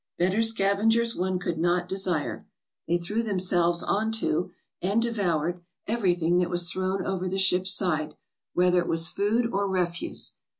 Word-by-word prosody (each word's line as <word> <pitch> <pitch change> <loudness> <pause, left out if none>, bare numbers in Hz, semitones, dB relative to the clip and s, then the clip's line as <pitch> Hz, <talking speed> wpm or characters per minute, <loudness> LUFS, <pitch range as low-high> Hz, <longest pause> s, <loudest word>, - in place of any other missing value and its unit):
Better 185 +5 +2
scavengers 225 +2 +2
one 185 0 -1
could 175 -3 -3
not 175 +1 +1
desire. 185 -5 -1 0.4
They 170 +2 +2
threw 205 +7 -2
themselves 180 -5 0
on 220 +2 0
to, 180 -6 -1 0.3
and 200 +5 +1
de 235 0 0
voured, 175 -5 -1 0.2
everything 180 -6 +1
that 180 -1 0
was 175 0 +1
thrown 190 0 -2
over 185 -1 -2
the 190 - -2
ship's 190 0 +3
side, 155 -5 -1 0.4
whether 180 0 +4
it 175 - -2
was 165 +1 +1
food 215 +6 +1
or 200 +1 +1
refuse. 175 -2 -2
185 Hz, 160 wpm, -26 LUFS, 175-200 Hz, 0.4 s, whether